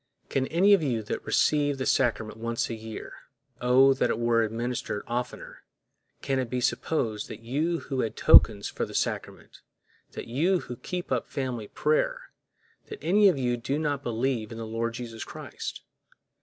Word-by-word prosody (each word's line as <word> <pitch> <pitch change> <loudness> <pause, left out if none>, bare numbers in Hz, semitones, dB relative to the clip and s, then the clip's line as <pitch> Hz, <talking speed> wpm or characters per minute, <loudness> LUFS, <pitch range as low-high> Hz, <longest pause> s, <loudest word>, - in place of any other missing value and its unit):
Can 135 -1 0
any 190 +5 +4
of 195 - +5
you 120 -7 -1
that 105 - -4
receive 145 -2 +2
the 130 - -3
sacrament 115 -4 +1
once 115 +1 -2
a - - -2
year—oh, 125 +4 0
that 130 - 0
it - - 0
were 115 0 +2
administered 115 -1 -2
oftener!—can 125 +2 -6
it 125 -2 -2
be 125 - -1
supposed 120 -4 -1
that 110 - -9
you 155 +8 -1
who 135 -2 -4
had 115 -3 -1
tokens 100 -2 +6
for - - -4
the - - -6
sacrament, - - -3 0.5
that - - -6
you 170 +10 +1
who 125 - -7
keep 180 +3 -5
up 125 -3 0
family 125 -6 -4
prayer, - - 0 0.6
that 430 - -7
any 205 +3 +5
of 180 - 0
you 125 -2 0
do 135 +4 -2
not 145 -3 -1
believe 120 -2 -1
in 115 - -7
the 115 - -5
Lord 115 +1 -3
Jesus 115 -2 -6
Christ? - - -7
125 Hz, 170 wpm, -27 LUFS, 115-145 Hz, 0.6 s, tokens